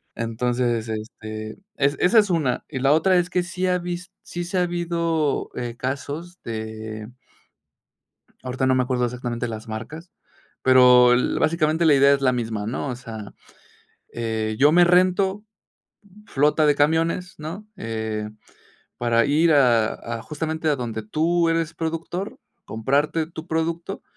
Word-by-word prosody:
Entonces, 120 0 -1
este, 110 0 -6 0.2
es 140 0 +1
esa 220 +6 +5
es 210 -2 +2
una. 150 -8 0
Y 135 - -5
la 135 +2 +3
otra 185 +5 +4
es 175 0 +1
que 180 0 +1
sí 180 +1 -3
ha 180 0 +2
vis 175 +1 -6
sí 175 - -6
se 180 +2 -3
ha 180 - +3
habido, 170 -3 -1
eh, 120 -1 -5
casos 145 +7 -5
de 110 -1 -6 1.3
ahorita 130 +1 -2
no 130 0 +3
me 130 - +2
acuerdo 125 -1 -1
exactamente 120 0 -4
las 110 +1 -7
marcas, 120 +11 -7 0.5
pero, 125 -1 +7
el 125 +1 +2
básicamente 160 0 +1
la 150 -3 +6
idea 140 +1 +6
es 140 - 0
la 130 -2 +3
misma, 115 -4 -3
¿no? 125 +6 -3
O 125 - -3
sea, 110 -4 -9 0.8
eh, 110 -2 -2
yo 145 +2 +5
me 175 +1 +6
rento, 185 +3 +3 0.8
flota 150 -1 +2
de 145 - +4
camiones, 165 +5 +1
¿no?, 170 +8 -7
eh, 110 - -4 0.7
para 115 -1 +2
ir 155 +4 +3
a 120 -6 +4
a 115 0 -6
justamente 160 +2 -3
a 150 - +2
donde 115 -3 -4
tú 165 +9 +1
eres 165 -1 0
productor, 165 +4 -4 0.3
comprarte 145 +8 0
tu 160 0 -9
producto 165 +3 -3
140 Hz, 150 wpm, -23 LUFS, 120-170 Hz, 1.3 s, pero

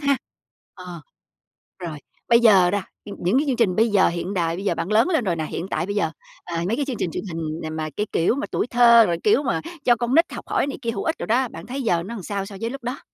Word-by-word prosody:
ha. 280 -1 +2 0.6
Ờ. 180 -2 -9 0.8
Rồi, 170 -4 -6 0.3
bây 235 -1 +6
giờ 195 -7 +5
ra 205 -1 -1 0.2
nh 205 - -8
những 190 +9 +2
cái 300 - 0
chương 265 - +1
trình 220 -7 +2
bây 225 +3 +3
giờ 205 -2 +4
hiện 175 +3 -4
đại, 170 -3 0
bây 195 +3 -6
giờ 175 - +1
bạn 165 +5 -3
lớn 225 +10 +4
lên 320 -8 +1
rồi 180 -5 0
nè, 160 -1 -3
hiện 170 +3 -5
tại 195 - -2
bây 200 +2 -4
giờ, 165 -6 0 0.3
à, 170 -1 -3
mấy 220 - 0
cái 285 - -1
chương 265 -3 -3
trình 170 - -1
truyền - - -4
hình 160 -1 -4
nà 160 - -4
mà 155 0 -4
cái 210 - 0
kiểu 170 +8 +2
mà 280 - -3
tuổi - - -1
thơ, 235 -2 +6
rồi 170 -1 0
kiểu 225 +7 +3
mà 270 - -1 0.2
cho 240 - +5
con 240 +2 -1
nít 335 +2 +3
học - - -7
hỏi - - 0
này 280 - -4
kia 230 - -1
hữu - - -4
ích 325 - 0
đồ - - -3
đó, 250 +4 +2
bạn - - -10
thấy 270 +3 -4
giờ 175 -7 +1
nó 205 +6 -7
làm 200 - -7
sao 200 0 -3
so 200 - -10
với 230 - -1
lúc 275 +1 -8
đó? 245 +3 -4
205 Hz, 290 wpm, -23 LUFS, 175-240 Hz, 0.8 s, bây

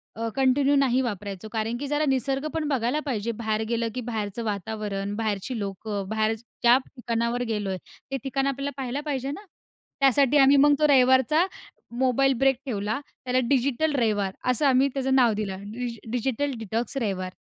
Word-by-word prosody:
अ, 230 +1 -3
continue 270 +2 +3
नाही 265 -2 +3
वापरायचो. 205 -4 -4
कारण 225 +1 -2
की 285 - -4
जरा 295 +1 +1
निसर्ग 270 +2 0
पण 315 -2 -1
बघायला 265 +1 0
पाहिजे. 230 -4 -2
बाहेर 220 -1 -2
गेलं, 230 0 0
की 255 - -2
बाहेरचं 215 0 -3
वातावरण, 205 -1 -3
बाहेरची 220 +2 -2
लोकं, 200 0 -4
बाहेर 220 0 +1
ज्या 240 +2 +2
ठिकाणावर 235 -1 -2
गेलोय 200 -3 -2 0.3
ते 270 - 0
ठिकाण 270 0 -1
आपल्याला 275 +1 -2
पाहायला 265 +1 -3
पाहिजे 275 -2 -2
ना? 405 +7 -8 0.5
त्यासाठी 275 +1 +4
आम्ही 275 +1 +6
मग 290 +1 +6
तो 300 - +4
रविवारचा 265 +5 +4 0.5
मोबाईल 265 +1 +3
ब्रेक 270 -1 +4
ठेवला. 215 0 -2 0.3
त्याला 255 0 +2
डिजिटल 280 +3 +1
रविवार 205 -6 +1 0.2
असं 285 +4 0
आम्ही 265 +1 +4
त्याचं 265 -1 0
नाव 240 -4 +5
दिलं. 195 -2 -4 0.5
डिजिटल 265 +3 -1
डिटॉक्स 225 +5 -3
रविवार! 190 -6 -2
245 Hz, 160 wpm, -25 LUFS, 220-275 Hz, 0.5 s, आम्ही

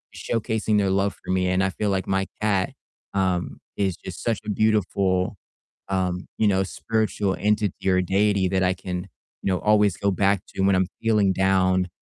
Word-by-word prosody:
showcasing 110 -2 -1
their 100 -2 +2
love 100 +1 +1
for - - -4
me, 90 0 +1
and 95 +1 +2
I 95 - +2
feel 105 +3 -2
like 95 -1 -1
my 95 0 0
cat, 100 -3 +1 0.4
um, 95 -2 0 0.2
is 95 -3 0
just 95 - -8
such 115 -3 0
a - - -4
beautiful, 100 -3 +1 0.5
um, 90 -1 -1
you 110 - +3
know, 95 -1 +3
spiritual 105 -2 -1
entity 105 -2 0
or 90 0 +3
deity 100 0 +2
that 95 -1 +1
I 90 0 +3
can, 90 -1 -5 0.3
you 95 - 0
know, 90 - 0
always 105 -3 +3
go 100 0 +1
back 100 0 +2
to - - -1
when 100 0 +4
I'm 95 -1 +2
feeling 105 -4 +3
down 95 -1 +2
95 Hz, 185 wpm, -24 LUFS, 95-105 Hz, 0.5 s, when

